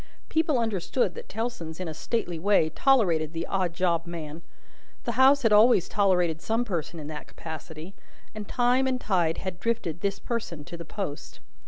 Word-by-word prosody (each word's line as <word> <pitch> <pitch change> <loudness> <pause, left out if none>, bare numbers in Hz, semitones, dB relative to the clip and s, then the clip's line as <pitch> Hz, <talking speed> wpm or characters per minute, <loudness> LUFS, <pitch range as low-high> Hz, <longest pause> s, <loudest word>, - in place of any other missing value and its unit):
People 315 -3 +2
understood 215 -2 0
that - - -10
Tellson's, 205 -8 -4
in 185 - -3
a 160 - -4
stately 175 -1 -2
way, 195 -3 +3
tolerated 170 - +3
the 165 0 -3
odd 185 -3 0
job 170 -2 +1
man. 165 -2 -6 0.6
The 235 - -1
house 265 +4 +5
had 225 -2 +4
always 210 -3 +6
tolerated 180 -5 +2
some 225 +4 0
person 170 -5 -3
in 150 - -7
that 150 -1 -7
capacity, 160 +2 -8 0.4
and 215 -1 -7
time 250 +2 +2
and 255 -1 0
tide 175 -8 +1
had 185 -2 -5
drifted 180 -8 -2
this 200 -1 -1
person 225 -10 -4
to 170 - -8
the 170 0 -8
post. 160 -4 -6
185 Hz, 175 wpm, -27 LUFS, 165-230 Hz, 0.6 s, always